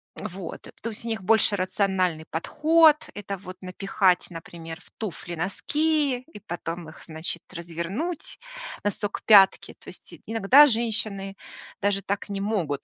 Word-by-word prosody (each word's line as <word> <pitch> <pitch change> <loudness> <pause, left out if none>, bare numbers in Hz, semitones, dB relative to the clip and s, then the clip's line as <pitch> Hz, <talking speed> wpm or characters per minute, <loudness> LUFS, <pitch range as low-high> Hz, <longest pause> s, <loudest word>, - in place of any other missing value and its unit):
Вот. 190 -4 -7 0.2
То 230 - -3
есть 225 +1 -8
у - - -4
них 225 -3 -2
больше 215 +1 +3
рациональный 185 -3 0
подход. 310 - +4 0.2
Это 200 -1 -5
вот 185 0 -10
напихать, 185 0 +1
например, 165 0 -8
в - - -21
туфли 175 -4 -5
носки 290 - 0
и - - -9
потом 175 -4 -6
их, 155 - -14
значит, 160 +1 -5
развернуть 175 - -4 0.4
носок 205 +1 -2
к - - -55
пятке. 195 -3 +6
То - - -13
есть - - -12
иногда 225 +6 +7
женщины 220 -5 -1 0.5
даже 200 -1 +1
так 200 +2 -3
не 200 -1 -3
могут. 185 -9 -1
195 Hz, 145 wpm, -26 LUFS, 175-225 Hz, 0.5 s, иногда